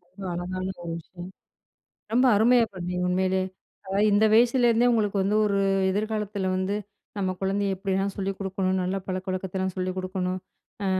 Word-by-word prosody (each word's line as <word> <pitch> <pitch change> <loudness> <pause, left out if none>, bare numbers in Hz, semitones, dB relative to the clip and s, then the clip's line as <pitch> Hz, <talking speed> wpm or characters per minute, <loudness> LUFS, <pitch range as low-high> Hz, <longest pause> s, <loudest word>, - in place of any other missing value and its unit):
ரொம்ப 195 -2 -8
அழகான 185 +1 -4 0.2
ஒரு 170 - -4
விஷயம். 175 +2 -10 0.8
ரொம்ப 250 +2 +4
அருமையா 235 +2 +5
பண்ணீங்க, 180 0 -3
உண்மையிலே. 185 +1 +1 0.4
அதாவது 195 +2 +1
இந்த 205 +2 +4
வயசுலேருந்தே 240 0 +4
உங்களுக்கு 210 -3 +1
வந்து 205 +2 +1
ஒரு 200 -1 +1 0.3
எதிர்காலத்தில 210 -1 -2
வந்து, 190 +2 -1 0.4
நம்ம 190 -1 0
குழந்தைய 195 0 0
எப்பிடியெல்லாம் 195 0 -1
சொல்லிக் 195 -1 -3
கொடுக்கணும், 190 -1 -1
நல்ல 185 +2 -1
பழக்கவழக்கத்தலாம் 185 0 -3
சொல்லிக் 185 0 -2
கொடுக்கணும். 185 0 -2 0.5
ஆ - - 0
190 Hz, 140 wpm, -26 LUFS, 185-205 Hz, 0.8 s, அருமையா